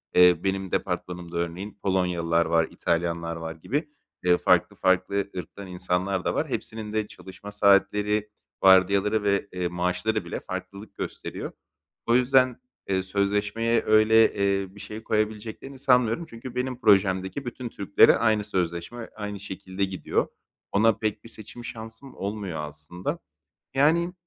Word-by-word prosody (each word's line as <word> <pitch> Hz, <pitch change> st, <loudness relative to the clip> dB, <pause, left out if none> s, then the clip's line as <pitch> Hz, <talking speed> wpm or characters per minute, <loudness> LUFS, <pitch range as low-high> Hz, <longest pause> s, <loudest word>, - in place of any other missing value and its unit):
eee, 90 Hz, -2 st, +6 dB
benim 95 Hz, -1 st, -1 dB
departmanımda 90 Hz, -1 st, -3 dB
örneğin 90 Hz, +5 st, -4 dB
Polonyalılar 85 Hz, -3 st, +1 dB
var, 80 Hz, 0 st, +2 dB
İtalyanlar 85 Hz, 0 st, -1 dB
var 80 Hz, 0 st, -6 dB
gibi, 145 Hz, -, -3 dB, 0.3 s
eee, 90 Hz, -1 st, +4 dB
farklı -, -, +3 dB
farklı 95 Hz, +2 st, +1 dB
ırktan 95 Hz, +3 st, -7 dB
insanlar 90 Hz, +1 st, -1 dB
da -, -, +1 dB
var. -, -, -1 dB
Hepsinin 110 Hz, -1 st, -5 dB
de 110 Hz, -1 st, 0 dB
çalışma 95 Hz, +1 st, -11 dB
saatleri, 105 Hz, +1 st, +3 dB, 0.3 s
vardiyaları 100 Hz, +3 st, +5 dB
ve, 100 Hz, 0 st, +1 dB
eee, 90 Hz, -1 st, -2 dB
maaşları 90 Hz, +5 st, -1 dB
bile -, -, -4 dB
farklılık 100 Hz, +2 st, -7 dB
gösteriyor. -, -, -5 dB, 0.6 s
O 115 Hz, -, +4 dB
yüzden, 130 Hz, -, +3 dB, 0.3 s
eee, 95 Hz, -1 st, +1 dB
sözleşmeye 105 Hz, +4 st, 0 dB
öyle, 110 Hz, +1 st, +5 dB
eee, 100 Hz, -1 st, 0 dB
bir -, -, -12 dB
şey 105 Hz, +2 st, -8 dB
koyabileceklerini 110 Hz, +5 st, -3 dB
sanmıyorum. 125 Hz, +2 st, +3 dB
Çünkü 120 Hz, +2 st, -9 dB
benim 125 Hz, 0 st, -2 dB
projemdeki 95 Hz, +3 st, +2 dB
bütün 120 Hz, 0 st, -5 dB
Türklere 100 Hz, -2 st, +5 dB
aynı 110 Hz, -2 st, +2 dB
sözleşme, 90 Hz, +6 st, -3 dB
aynı 105 Hz, -1 st, -5 dB
şekilde 95 Hz, -1 st, -5 dB
gidiyor. 95 Hz, -1 st, -1 dB, 0.4 s
Ona 110 Hz, +3 st, +4 dB
pek 110 Hz, -1 st, -2 dB
bir 115 Hz, -, -12 dB
seçim 115 Hz, +2 st, -10 dB
şansım 115 Hz, +2 st, -9 dB
olmuyor 100 Hz, -4 st, -4 dB
aslında. 75 Hz, +4 st, -5 dB, 0.5 s
Yani, 165 Hz, +6 st, +3 dB
100 Hz, 135 wpm, -26 LUFS, 90-110 Hz, 0.6 s, eee